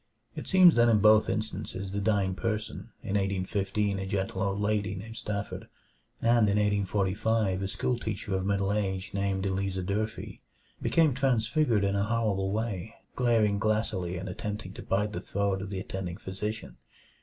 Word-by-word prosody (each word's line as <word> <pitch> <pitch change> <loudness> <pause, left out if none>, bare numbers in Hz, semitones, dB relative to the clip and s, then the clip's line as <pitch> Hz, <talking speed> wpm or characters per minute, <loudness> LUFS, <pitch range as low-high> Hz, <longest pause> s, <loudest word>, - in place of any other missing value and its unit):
It - - -6
seems 185 -3 +7
that 120 0 +6
in 110 - +5
both 110 +1 +5
instances 100 -2 -3
the 100 +1 -2
dying 100 -3 +1
person, 110 +2 -3
in - - -7
1815 100 +1 0
a 95 - -4
gentle 95 -1 -2
old 100 0 0
lady 105 -2 0
named 110 +4 -8
Stafford 100 -2 -4 0.5
and 115 -2 +4
in 100 - +2
1845 100 0 +1
a 95 - -1
schoolteacher 110 -2 -2
of 95 -1 0
middle 100 0 +1
age 95 -2 -2
named 100 -1 -1
Eleazar 95 -1 -1
Durfee, 105 +3 -3 0.4
became 160 -4 +3
transfigured 125 -2 +2
in 100 0 +1
a 100 0 +1
horrible 105 -4 0
way, 110 -1 -3 0.2
glaring 110 -5 +2
glassily 105 -5 0
and 95 +2 -5
attempting 105 +1 -5
to - - -8
bite 105 +2 0
the - - -4
throat 100 -1 -1
of 95 - -5
the 95 -2 -3
attending 95 -2 -5
physician. 105 +4 -5
100 Hz, 160 wpm, -29 LUFS, 95-110 Hz, 0.5 s, seems